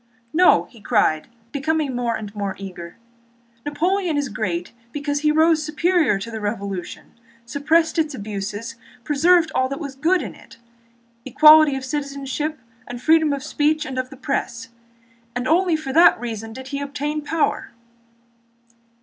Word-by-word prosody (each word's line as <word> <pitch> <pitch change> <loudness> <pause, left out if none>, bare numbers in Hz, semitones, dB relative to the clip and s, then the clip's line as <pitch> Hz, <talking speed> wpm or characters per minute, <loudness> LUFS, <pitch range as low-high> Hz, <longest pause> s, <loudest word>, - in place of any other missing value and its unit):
"No," 360 +3 +5 0.2
cried 155 -10 +1
he, - - -31 0.2
becoming 290 -1 -1
more 240 -2 -1
and 205 -2 -7
more 200 -2 -3
eager, 175 -3 -9 0.7
"Napoleon 345 +2 0
is 285 -2 -1
great 180 -5 -3 0.2
because 290 +1 -2
he 300 0 +2
rose 315 +1 +3
superior 315 - +1
to 220 +4 -7
the 220 - -5
Revolution, 200 -3 -5 0.3
suppressed 315 +6 +1
its 310 -3 0
abuses, 210 +3 -5 0.3
preserved 320 +4 +3
all 260 0 +1
that 275 - -4
was 280 -4 -6
good 330 +7 +1
in - - -7
it—equality 235 +6 +2
of 265 -1 -5
citizenship 280 +2 -3 0.3
and 245 0 -7
freedom 315 +2 +3
of 280 -2 -3
speech 305 +1 0
and 265 -2 -4
of 255 0 -3
the 270 - -12
press—and 235 -2 -6
only 350 +2 +3
for 310 -4 -4
that 335 -5 +6
reason 225 -2 -5
did 260 +3 -9
he 280 +1 -4
obtain 290 +2 -3
power." 310 +2 -1
270 Hz, 145 wpm, -22 LUFS, 235-310 Hz, 0.7 s, that